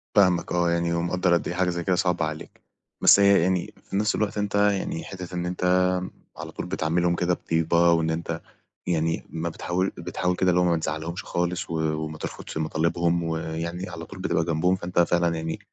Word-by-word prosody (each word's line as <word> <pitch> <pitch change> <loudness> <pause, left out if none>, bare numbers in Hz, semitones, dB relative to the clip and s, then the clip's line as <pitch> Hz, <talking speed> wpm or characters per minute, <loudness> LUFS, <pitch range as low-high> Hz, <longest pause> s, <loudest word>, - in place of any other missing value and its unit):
فاهمك 90 -4 +4
آه 85 -1 +2
يعني، 85 0 0
ومقدّر 85 +1 +1
قد 85 - +1
إيه 90 - -3
حاجة 90 0 +1
زي 85 -1 -2
كده 95 0 +2
صعبة 90 -2 +1
عليك، 80 0 -7 0.4
بس - - +8
هي 100 -1 +6
يعني 90 0 0 0.2
في - - -4
نفس 105 +2 +2
الوقت 105 -1 -1
أنت 105 0 -1
يعني 100 -4 +1
حتة 90 -2 -7
إن 90 0 -2
أنت 90 +1 -4 0.7
على - - -7
طول - - -5
بتعاملهم 85 +2 0
كده 90 0 +1
بطيبة، 85 0 +2
وإن 80 -1 +2
أنت 80 0 -3 0.5
يعني 80 -1 0
ما 80 +1 -3
بتحاول 90 +3 -1
بتحاول 90 +1 -1
كده 95 +1 +2
اللي 90 0 +3
هو - - +3
ما 85 -1 +3
تزعلهمش 80 +2 -4
خالص، 90 0 -2
و - - -4 0.3
وما 80 0 -6
ترفضش - - -6
مطالبهم 85 +2 0
ويعني 80 +2 -3
على 85 -1 -7
طول 95 +3 -11
بتبقى 85 -3 0
جنبهم 85 +3 +2
فأنت 90 -1 -2
فعلًا 85 -1 +2
يعني 80 0 -4
85 Hz, 195 wpm, -25 LUFS, 80-90 Hz, 0.7 s, بس